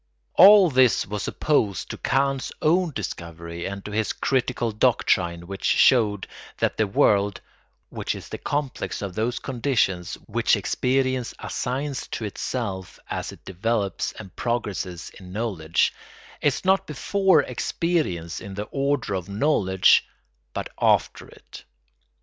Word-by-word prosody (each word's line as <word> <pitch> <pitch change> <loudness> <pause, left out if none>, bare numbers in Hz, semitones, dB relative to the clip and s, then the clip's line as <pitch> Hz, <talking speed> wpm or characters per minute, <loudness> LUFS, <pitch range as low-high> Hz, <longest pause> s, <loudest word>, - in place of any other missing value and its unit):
All 195 -2 +8
this 130 -2 +4
was 105 +1 -4
opposed 110 -11 0
to - - -6
Kant's 135 0 0
own 175 +3 +3
discovery 85 - -6
and 100 0 -6
to 105 - -6
his 110 +1 0
critical 125 -3 0
doctrine 95 -7 +1
which 95 +2 -8
showed 105 -6 +4 0.3
that - - 0
the 110 - +2
world 100 0 +2 0.5
(which - - -3
is - - -9
the - - -7
complex 145 -7 -3
of 100 -2 -4
those 115 +5 -1
conditions 115 -9 -1
which - - +2
experience 130 -1 0
assigns 135 +2 -3
to 110 - -4
itself 100 -4 -4
as - - -3
it - - -15
develops 100 +1 -1
and 95 -3 -11
progresses 100 -7 -3
in 90 -2 -12
knowledge) 95 -7 0 0.5
is 145 +4 0
not 190 0 +3
before 190 +6 +2
experience 145 - -2
in 100 -1 -8
the 105 +1 -4
order 140 -5 0
of 95 0 -4
knowledge, 100 - +3 0.5
but - - -3
after - - +2
it. - - -14
110 Hz, 130 wpm, -24 LUFS, 95-135 Hz, 0.5 s, All